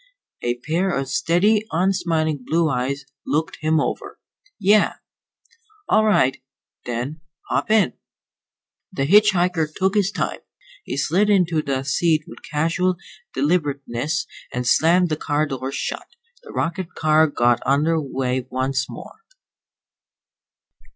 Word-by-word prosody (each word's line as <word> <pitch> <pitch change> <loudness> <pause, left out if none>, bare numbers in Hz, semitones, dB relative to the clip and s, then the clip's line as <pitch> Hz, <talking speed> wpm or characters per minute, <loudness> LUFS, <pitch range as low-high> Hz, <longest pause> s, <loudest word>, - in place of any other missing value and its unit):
A 120 0 0
pair 170 +7 0
of 135 -6 -1
steady, 175 +9 +2
unsmiling 165 -5 0
blue 160 +3 +1
eyes 135 +2 -2 0.2
looked 155 +2 -1
him 155 0 +2
over. - - -3 0.4
"Yeah." 205 +2 +4 0.9
"All 215 0 +4
right, 135 -13 +2 0.5
then. 125 +6 -4 0.3
Hop - - 0
in." 215 - +3 1.0
The 135 - -1
hitch 210 +6 +6
hiker 175 -3 +1
took 190 +4 0
his 205 -3 +2
time. - - -2 0.5
He - - -4
slid 180 +9 +2
into 175 -6 +3
the 135 -2 -2
seat 155 +3 +1
with - - -12
casual 165 +4 0 0.4
deliberateness 145 -1 -1 0.3
and 125 0 -3
slammed 170 +7 +4
the 155 - -1
car 150 0 0
door 135 -2 -4
shut. 140 - -4 0.3
The 470 - -12
rocket 170 +2 -3
car 155 0 +4
got 120 -4 +2
under 155 +4 +2
way 130 -2 -2
once 130 +1 -1
more. - - -10
155 Hz, 125 wpm, -22 LUFS, 135-180 Hz, 1.0 s, hitch